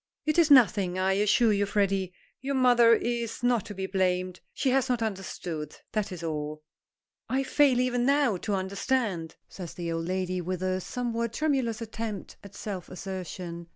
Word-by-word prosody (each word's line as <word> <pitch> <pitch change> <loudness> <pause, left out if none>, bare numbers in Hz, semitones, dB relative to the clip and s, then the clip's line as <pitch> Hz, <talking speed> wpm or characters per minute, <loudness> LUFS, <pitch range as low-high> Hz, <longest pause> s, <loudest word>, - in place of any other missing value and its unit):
"It 310 +2 +2
is 325 -2 +5
nothing, 205 -9 +5
I 190 +1 +2
assure 210 +3 +3
you, 205 0 +1
Freddy. 195 -2 +1 0.3
Your 275 +1 -2
mother 240 -3 +6
is 235 -1 -3
not 245 -4 +2
to 205 - -7
be 190 0 -3
blamed. 185 -1 0
She 265 - 0
has 265 0 +2
not 245 -2 +1
understood. 180 -7 -4 0.2
That 215 -3 -1
is 175 -2 -7
all." 155 -1 -4 0.7
"I 270 +1 +1
fail 270 -2 +3
even 250 -1 +1
now 280 -7 +3
to 205 +3 -2
understand," 190 -2 -1
says 180 -4 -9
the 170 -1 -4
old 165 0 -2
lady, 185 0 -1
with 180 +1 -3
a 185 0 0
somewhat 235 +1 -3
tremulous 260 -6 0
attempt 220 -3 -6
at 200 0 -12
self 190 -5 -6
assertion. 180 -2 -6
200 Hz, 170 wpm, -28 LUFS, 185-240 Hz, 0.7 s, mother